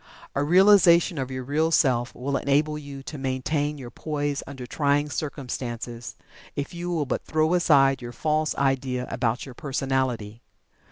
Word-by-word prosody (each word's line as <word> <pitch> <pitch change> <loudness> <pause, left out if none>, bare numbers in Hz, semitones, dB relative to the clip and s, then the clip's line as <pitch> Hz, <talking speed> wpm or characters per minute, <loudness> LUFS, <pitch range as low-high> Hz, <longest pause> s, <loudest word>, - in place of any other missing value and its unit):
A 140 - 0
realization 175 -1 +5
of 130 -1 -3
your 130 -1 -4
Real 150 +5 +1
Self 130 -6 +2
will 135 +2 -2
enable 145 +3 +1
you 140 -2 -8
to 145 +1 -7
maintain 145 +3 -1
your 125 -3 -9
poise 145 -1 -2
under 130 -3 -7
trying 145 +2 0
circumstances, 120 -5 -5 0.4
if 145 +3 -4
you 175 +1 -4
will 165 -4 0
but 135 - -2
throw 155 +2 +1
aside 140 -7 +4
your 120 0 -6
false 155 +4 0
idea 135 -2 0
about 120 -1 -1
your 135 - -10
personality. 130 -5 -2
140 Hz, 155 wpm, -25 LUFS, 130-155 Hz, 0.4 s, realization